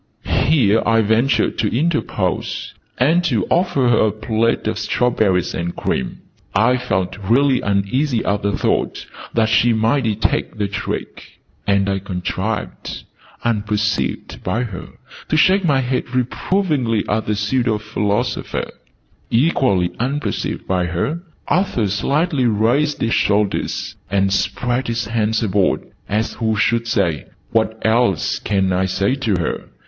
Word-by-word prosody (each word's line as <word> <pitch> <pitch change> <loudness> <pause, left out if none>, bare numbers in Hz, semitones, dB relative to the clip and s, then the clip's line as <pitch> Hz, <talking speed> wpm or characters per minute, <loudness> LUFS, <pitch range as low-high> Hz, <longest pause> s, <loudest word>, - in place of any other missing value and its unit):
Here 115 -7 +3
I 115 +1 +3
ventured 110 +2 +2
to - - +2
interpose, 130 - -1 0.2
and 160 +8 +3
to 115 - +1
offer 170 -8 +2
her 115 -2 +4
a - - +1
plate 110 +2 0
of 110 -1 -1
strawberries 105 -5 +1
and 85 0 -3
cream. 65 - -2 0.3
I 120 +5 +4
felt 95 -6 -2
really 125 +6 +3
uneasy 110 +6 0
at 100 +1 0
the 100 0 0
thought - - -1 0.3
that 115 -1 +3
she 115 +2 +3
might 115 +4 +1
detect 110 0 -1
the 105 -1 0
trick: 100 - -6 0.3
and 100 -1 +2
I 95 0 0
contrived, 95 +3 -4 0.4
unperceived 105 - -1
by 110 +7 0
her, 100 -7 -6 0.4
to 155 - +2
shake 190 +5 +4
my 140 -6 +3
head 125 0 -1
reprovingly 130 - 0
at 110 +1 -1
the 105 - +1
pseudo 110 +2 +1
philosopher. 105 -1 -2 0.6
Equally 115 - +2
unperceived 140 +5 -2
by 90 -1 +1
her, 90 - -2 0.3
Arthur 180 - +1
slightly 135 - +1
raised 120 +8 +1
his 115 - +1
shoulders, 100 -1 0
and 95 0 +1
spread 120 +6 -1
his 115 -1 -1
hands 110 0 0
abroad, 100 -2 +1 0.3
as 110 +2 0
who 110 -2 -1
should 115 +2 +1
say 90 -9 0 0.2
"What 110 0 +1
else 110 -5 +2
can 95 -2 0
I 95 +1 +1
say 100 +5 0
to 125 -7 0
her?" 85 -3 -3
110 Hz, 135 wpm, -19 LUFS, 100-125 Hz, 0.6 s, her